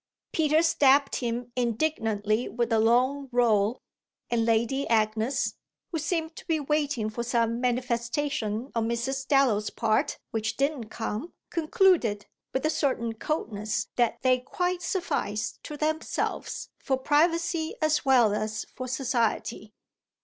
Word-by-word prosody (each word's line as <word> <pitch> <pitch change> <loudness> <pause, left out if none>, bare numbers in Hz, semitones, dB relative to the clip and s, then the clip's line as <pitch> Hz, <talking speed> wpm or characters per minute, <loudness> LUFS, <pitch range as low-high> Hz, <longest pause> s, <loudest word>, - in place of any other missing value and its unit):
Peter 310 0 +3
stabbed 280 -3 +4
him 240 0 -3
indignantly 225 -3 0
with 235 0 -1
a 220 - +4
long 255 +5 +2
roll, 230 -2 +2 0.5
and 230 -1 +2
Lady 235 +5 +1
Agnes, 220 +3 +1 0.4
who 325 - -1
seemed 320 0 -2
to - - -9
be 325 -2 +1
waiting 285 -6 0
for 215 +2 -4
some 235 0 0
manifestation 245 0 -1
on 230 -1 0
Mrs. 265 +3 -2
Dallow's 250 -7 +3
part 265 +7 0
which 220 0 -2
didn't 275 -5 -1
come, 225 +7 -4 0.2
concluded, 330 - +2 0.3
with 265 +3 -1
a 310 - +3
certain 235 -7 0
coldness, 220 -5 -2
that 240 -2 +1
they 255 -1 +4
quite 355 +7 -2
sufficed 285 - -2
to 300 - -6
themselves 310 +1 -2
for 265 -2 0
privacy 320 +3 +1
as 310 0 +2
well 245 -6 +5
as 215 +1 -2
for 255 - -5
society. 240 -4 -1
250 Hz, 130 wpm, -27 LUFS, 225-300 Hz, 0.5 s, well